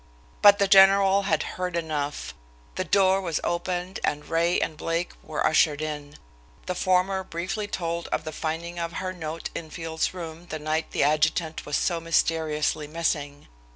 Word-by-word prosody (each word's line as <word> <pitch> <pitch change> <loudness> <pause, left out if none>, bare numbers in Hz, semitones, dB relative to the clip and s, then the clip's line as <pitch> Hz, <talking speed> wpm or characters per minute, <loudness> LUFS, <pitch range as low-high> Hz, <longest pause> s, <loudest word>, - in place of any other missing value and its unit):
But 205 0 +8
the 200 -1 +2
general 195 0 +6
had 160 -1 +2
heard 180 -1 -4
enough. 150 -3 -3 0.4
The 185 - -2
door 190 +2 +3
was 170 -5 -1
opened 180 +1 -2
and 150 0 -1
Ray 170 +2 +2
and 155 - -2
Blake 165 +2 -2
were 155 - -2
ushered 155 -2 +3
in. 150 -1 -5 0.5
The 180 - -2
former 185 +1 +1
briefly 185 +5 -4
told 170 -3 -3
of - - -2
the 155 - -5
finding 170 +3 -4
of 170 0 -3
her 185 +2 -3
note 160 -2 -5
in 160 -2 -6
Field's 160 0 -2
room 170 -1 -8
the 155 - -4
night 155 +1 -2
the - - 0
adjutant 155 +2 +1
was 145 - 0
so 170 -2 0
mysteriously 160 -2 0
missing. 145 -2 -2
165 Hz, 165 wpm, -26 LUFS, 155-185 Hz, 0.5 s, But